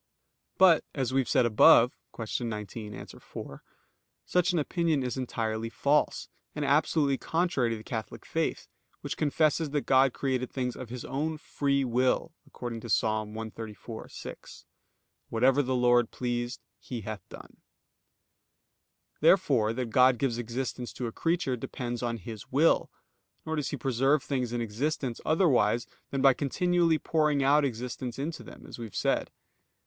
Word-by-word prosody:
But, 180 Hz, -4 st, +6 dB
as 130 Hz, -3 st, -1 dB
we 135 Hz, -, +4 dB
have 130 Hz, -, -6 dB
said 125 Hz, -, +4 dB
above 115 Hz, +2 st, +6 dB, 0.2 s
(Q. 115 Hz, +2 st, -3 dB
19, 105 Hz, -1 st, -6 dB
A. -, -, -8 dB
4), -, -, -10 dB, 0.6 s
such 180 Hz, +1 st, +2 dB
an 175 Hz, -, 0 dB
opinion 160 Hz, -2 st, +1 dB
is 125 Hz, -, -2 dB
entirely 115 Hz, -3 st, -2 dB
false, 145 Hz, +5 st, +1 dB, 0.3 s
and 150 Hz, -1 st, -2 dB
absolutely 145 Hz, -1 st, +2 dB
contrary 160 Hz, -8 st, 0 dB
to 115 Hz, -, -2 dB
the 110 Hz, -, -11 dB
Catholic 110 Hz, -4 st, -6 dB
faith, -, -, -2 dB, 0.3 s
which -, -, -4 dB
confesses 155 Hz, +1 st, +1 dB
that 145 Hz, 0 st, 0 dB
God 135 Hz, 0 st, +5 dB
created 130 Hz, -1 st, -2 dB
things 125 Hz, -2 st, -3 dB
of 130 Hz, -3 st, -8 dB
His 125 Hz, 0 st, -6 dB
own 155 Hz, +3 st, -2 dB
free 140 Hz, -2 st, 0 dB
will, 125 Hz, +1 st, +1 dB
according 120 Hz, -2 st, -6 dB
to 120 Hz, -, -9 dB
Ps. 100 Hz, -, +3 dB
134:6: 110 Hz, +1 st, -6 dB, 0.6 s
"Whatsoever 130 Hz, +5 st, +3 dB
the 130 Hz, -1 st, -1 dB
Lord 120 Hz, -1 st, +4 dB
pleased, 120 Hz, 0 st, -3 dB, 0.2 s
He 120 Hz, -3 st, -6 dB
hath 110 Hz, -1 st, -6 dB
done." -, -, -12 dB, 1.6 s
Therefore 140 Hz, -, +4 dB
that 120 Hz, 0 st, -3 dB
God 125 Hz, +1 st, +5 dB
gives 120 Hz, -1 st, -1 dB
existence 120 Hz, +1 st, -4 dB
to 125 Hz, -, -4 dB
a 115 Hz, -, -3 dB
creature 165 Hz, -2 st, 0 dB
depends 120 Hz, 0 st, -5 dB
on 120 Hz, -1 st, -2 dB
His 110 Hz, +1 st, -9 dB
will; 150 Hz, +5 st, +3 dB, 0.6 s
nor 160 Hz, 0 st, -2 dB
does 150 Hz, -3 st, -2 dB
He 145 Hz, -, -3 dB
preserve 135 Hz, +3 st, +2 dB
things 130 Hz, -4 st, -2 dB
in 120 Hz, 0 st, -2 dB
existence 120 Hz, +3 st, -2 dB
otherwise 125 Hz, -, +3 dB, 0.2 s
than 135 Hz, -1 st, -2 dB
by 135 Hz, -1 st, +7 dB
continually 170 Hz, +4 st, +1 dB
pouring 150 Hz, -3 st, +1 dB
out 145 Hz, +2 st, +4 dB
existence 125 Hz, -1 st, -4 dB
into 155 Hz, +4 st, -4 dB
them, -, -, -12 dB
as -, -, -10 dB
we 115 Hz, -, -5 dB
have 110 Hz, -, -11 dB
said. -, -, 0 dB
130 Hz, 155 wpm, -29 LUFS, 115-145 Hz, 1.6 s, by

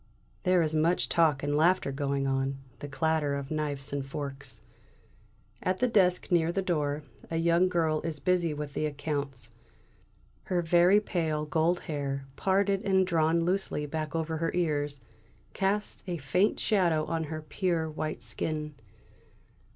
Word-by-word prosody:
There 180 Hz, -2 st, +3 dB
is 155 Hz, -1 st, 0 dB
much 160 Hz, +3 st, +2 dB
talk 155 Hz, -5 st, +3 dB
and 145 Hz, 0 st, 0 dB
laughter 165 Hz, -1 st, +3 dB
going 140 Hz, 0 st, -1 dB
on; 135 Hz, 0 st, 0 dB, 0.2 s
the 145 Hz, -, -6 dB
clatter 150 Hz, 0 st, 0 dB
of 140 Hz, 0 st, -5 dB
knives 145 Hz, -3 st, -2 dB
and 140 Hz, -1 st, -1 dB
forks. 140 Hz, 0 st, -6 dB, 1.0 s
At 185 Hz, 0 st, 0 dB
the 250 Hz, -, +2 dB
desk 185 Hz, -5 st, +2 dB
near 170 Hz, -1 st, +3 dB
the 195 Hz, +2 st, -1 dB
door, 150 Hz, -4 st, -1 dB, 0.3 s
a 165 Hz, -, -1 dB
young 170 Hz, +2 st, +3 dB
girl 160 Hz, -3 st, +1 dB
is 160 Hz, -3 st, -3 dB
busy 175 Hz, +1 st, +1 dB
with 150 Hz, -1 st, -5 dB
the 155 Hz, -, 0 dB
accounts. 140 Hz, -5 st, -4 dB, 0.9 s
Her 175 Hz, -2 st, 0 dB
very 175 Hz, +4 st, +5 dB
pale 160 Hz, -7 st, -1 dB
gold 165 Hz, +3 st, +1 dB
hair, 140 Hz, -3 st, -3 dB
parted 195 Hz, 0 st, +1 dB
and 190 Hz, -1 st, +3 dB
drawn 165 Hz, -1 st, +2 dB
loosely 180 Hz, -5 st, -1 dB
back 155 Hz, +1 st, -4 dB
over 160 Hz, -1 st, -1 dB
the 165 Hz, +2 st, -1 dB
ears, 145 Hz, -5 st, -1 dB, 0.5 s
casts 200 Hz, +2 st, -1 dB
a 175 Hz, -1 st, -2 dB
faint 175 Hz, +9 st, +1 dB
shadow 170 Hz, -7 st, +2 dB
on 160 Hz, 0 st, -2 dB
her 155 Hz, 0 st, -6 dB
pure, 170 Hz, 0 st, -1 dB
white 155 Hz, 0 st, -4 dB
skin. 150 Hz, -1 st, -3 dB
160 Hz, 150 wpm, -29 LUFS, 145-175 Hz, 1.0 s, very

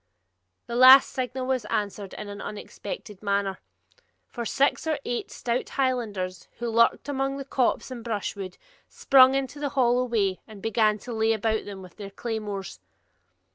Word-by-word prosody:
This 235 Hz, -, -4 dB
last 260 Hz, +2 st, +9 dB
signal 255 Hz, 0 st, -3 dB
was 260 Hz, -2 st, 0 dB
answered 205 Hz, -2 st, -3 dB
in 210 Hz, -, -7 dB
an 205 Hz, 0 st, -7 dB
unexpected 210 Hz, -, -7 dB
manner; 200 Hz, -2 st, -1 dB, 0.7 s
for 240 Hz, -2 st, -5 dB
six 275 Hz, +6 st, +1 dB
or 310 Hz, -2 st, +1 dB
eight 240 Hz, -1 st, -3 dB
stout 240 Hz, +1 st, -2 dB
Highlanders, 215 Hz, -9 st, -2 dB
who 235 Hz, 0 st, -3 dB
lurked 230 Hz, +4 st, +3 dB
among 275 Hz, -1 st, -1 dB
the 275 Hz, -, -6 dB
copse 260 Hz, -1 st, 0 dB
and 240 Hz, -3 st, -7 dB
brushwood, 200 Hz, -4 st, -4 dB, 0.3 s
sprung 265 Hz, -1 st, +5 dB
into 275 Hz, +1 st, -2 dB
the 290 Hz, -1 st, -1 dB
hollow 250 Hz, 0 st, +3 dB
way 205 Hz, -6 st, 0 dB
and 215 Hz, -2 st, -11 dB
began 215 Hz, 0 st, +2 dB
to 245 Hz, -, -5 dB
lay 220 Hz, 0 st, +2 dB
about 220 Hz, 0 st, -1 dB
them 195 Hz, -2 st, -8 dB
with 180 Hz, -, -14 dB
their 200 Hz, -2 st, -7 dB
claymores. 205 Hz, -, -5 dB
230 Hz, 160 wpm, -26 LUFS, 205-255 Hz, 0.7 s, last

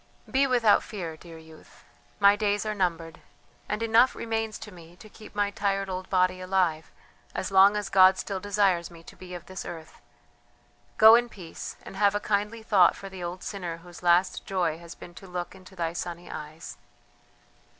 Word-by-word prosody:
"Be 275 Hz, +1 st, +2 dB
without 240 Hz, -5 st, +4 dB
fear, 175 Hz, -7 st, -6 dB
dear 165 Hz, 0 st, -13 dB
youth; 160 Hz, -1 st, -17 dB, 0.4 s
my 200 Hz, 0 st, +6 dB
days 205 Hz, 0 st, 0 dB
are 215 Hz, -, -1 dB
numbered, 165 Hz, -5 st, -2 dB, 0.5 s
and 210 Hz, +2 st, -2 dB
enough 230 Hz, +3 st, +4 dB
remains 225 Hz, -1 st, -3 dB
to 210 Hz, -, -10 dB
me 170 Hz, -2 st, -14 dB
to 200 Hz, -, -14 dB
keep 215 Hz, 0 st, -15 dB
my 205 Hz, -1 st, 0 dB
tired 195 Hz, -1 st, -1 dB
old 185 Hz, 0 st, -5 dB
body 185 Hz, -1 st, +1 dB
alive, 185 Hz, -4 st, 0 dB, 0.5 s
as 190 Hz, -, -3 dB
long 195 Hz, +2 st, +6 dB
as 210 Hz, -, -3 dB
God 190 Hz, -1 st, +6 dB
still 195 Hz, -2 st, -4 dB
desires 195 Hz, -3 st, +1 dB
me 165 Hz, -1 st, -14 dB
to -, -, -14 dB
be 180 Hz, -1 st, -10 dB
of 175 Hz, 0 st, -9 dB
this 190 Hz, 0 st, -7 dB
earth. 160 Hz, -2 st, -10 dB, 1.0 s
Go 220 Hz, +1 st, +9 dB
in 240 Hz, +1 st, +4 dB
peace, 180 Hz, -7 st, -9 dB
and -, -, -10 dB
have 200 Hz, 0 st, +3 dB
a -, -, +1 dB
kindly 210 Hz, +2 st, -2 dB
thought 195 Hz, -5 st, +4 dB
for 195 Hz, -, -9 dB
the 190 Hz, -2 st, -8 dB
old 175 Hz, +1 st, -6 dB
sinner 180 Hz, -5 st, -5 dB
whose 175 Hz, 0 st, -14 dB
last 175 Hz, +1 st, +2 dB
joy 175 Hz, -4 st, -1 dB
has 170 Hz, 0 st, -11 dB
been 175 Hz, -, -12 dB
to 195 Hz, -, -12 dB
look 180 Hz, -1 st, -5 dB
into 190 Hz, 0 st, -15 dB
thy 165 Hz, -2 st, -2 dB
sunny 175 Hz, 0 st, -6 dB
eyes!" 155 Hz, +1 st, -8 dB
190 Hz, 190 wpm, -27 LUFS, 175-205 Hz, 1.0 s, Go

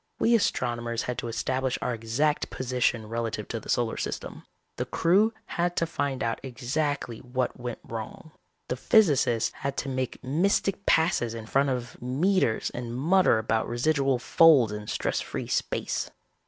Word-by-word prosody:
We 235 Hz, -, +3 dB
astronomers 120 Hz, -, 0 dB
had 125 Hz, -, -3 dB
to -, -, -4 dB
establish 130 Hz, +3 st, -1 dB
our 125 Hz, -, -1 dB
exact 120 Hz, +7 st, 0 dB
position 125 Hz, -3 st, -1 dB
relative 115 Hz, -2 st, -3 dB
to 115 Hz, -, -3 dB
the -, -, -13 dB
solar 120 Hz, -2 st, +1 dB
system. -, -, -5 dB, 0.3 s
The -, -, -1 dB
crew 195 Hz, +7 st, +3 dB
had 175 Hz, -2 st, -1 dB
to 165 Hz, -, +1 dB
find 140 Hz, -5 st, -2 dB
out 115 Hz, 0 st, -1 dB
exactly 130 Hz, 0 st, -2 dB
what 125 Hz, 0 st, -3 dB
went 120 Hz, -1 st, -4 dB
wrong. 115 Hz, +7 st, -7 dB, 0.4 s
The 125 Hz, -, -1 dB
physicists 130 Hz, -, +3 dB
had 140 Hz, 0 st, -3 dB
to 140 Hz, -, -2 dB
make 130 Hz, -1 st, -3 dB
mystic 190 Hz, +7 st, 0 dB
passes 120 Hz, -8 st, +2 dB
in 115 Hz, -1 st, -7 dB
front 135 Hz, +5 st, +2 dB
of 125 Hz, -1 st, -4 dB
meters 135 Hz, -, +1 dB
and 120 Hz, 0 st, -5 dB
mutter 170 Hz, -1 st, +4 dB
about 110 Hz, 0 st, 0 dB
residual 135 Hz, +2 st, +1 dB
folds 135 Hz, -3 st, +5 dB
in 105 Hz, 0 st, -6 dB
stress -, -, -1 dB
free -, -, -5 dB
space. -, -, -2 dB
125 Hz, 155 wpm, -27 LUFS, 115-150 Hz, 0.4 s, folds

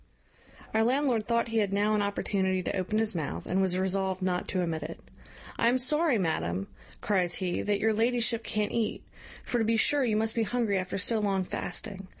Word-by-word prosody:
Our 220 Hz, 0 st, +3 dB
landlord 245 Hz, -3 st, +1 dB
thought 235 Hz, 0 st, +1 dB
he 225 Hz, 0 st, +1 dB
had 205 Hz, -2 st, +1 dB
now 205 Hz, +2 st, +2 dB
an 210 Hz, -, +2 dB
opportunity 190 Hz, -2 st, 0 dB
to -, -, -2 dB
open 190 Hz, +3 st, -1 dB
his 220 Hz, 0 st, +2 dB
mouth, 160 Hz, -5 st, -4 dB
and 190 Hz, +2 st, +1 dB
was 185 Hz, -1 st, +2 dB
resolved 190 Hz, 0 st, 0 dB
not 180 Hz, -1 st, -1 dB
to 185 Hz, -2 st, 0 dB
omit 160 Hz, -2 st, -2 dB
it. 160 Hz, +3 st, -7 dB, 0.6 s
"I 230 Hz, -, +4 dB
am 250 Hz, -, +3 dB
sorry, 300 Hz, +2 st, +1 dB
madam," 95 Hz, -, -1 dB, 0.4 s
cries 185 Hz, -4 st, +1 dB
he, 180 Hz, -2 st, -1 dB
"that 205 Hz, -1 st, 0 dB
your 220 Hz, +1 st, +2 dB
ladyship 230 Hz, +1 st, +1 dB
can't 210 Hz, -2 st, -1 dB
eat; 230 Hz, -2 st, -1 dB, 0.4 s
for 240 Hz, -, -1 dB
to -, -, +2 dB
be 225 Hz, +1 st, +2 dB
sure 285 Hz, +5 st, +3 dB
you 225 Hz, -4 st, +1 dB
must 220 Hz, 0 st, +1 dB
be 230 Hz, -, 0 dB
hungry 220 Hz, -3 st, 0 dB
after 185 Hz, +1 st, -3 dB
so 220 Hz, +3 st, +1 dB
long 195 Hz, -2 st, +1 dB
fasting. 195 Hz, +2 st, -5 dB
210 Hz, 205 wpm, -29 LUFS, 185-230 Hz, 0.6 s, I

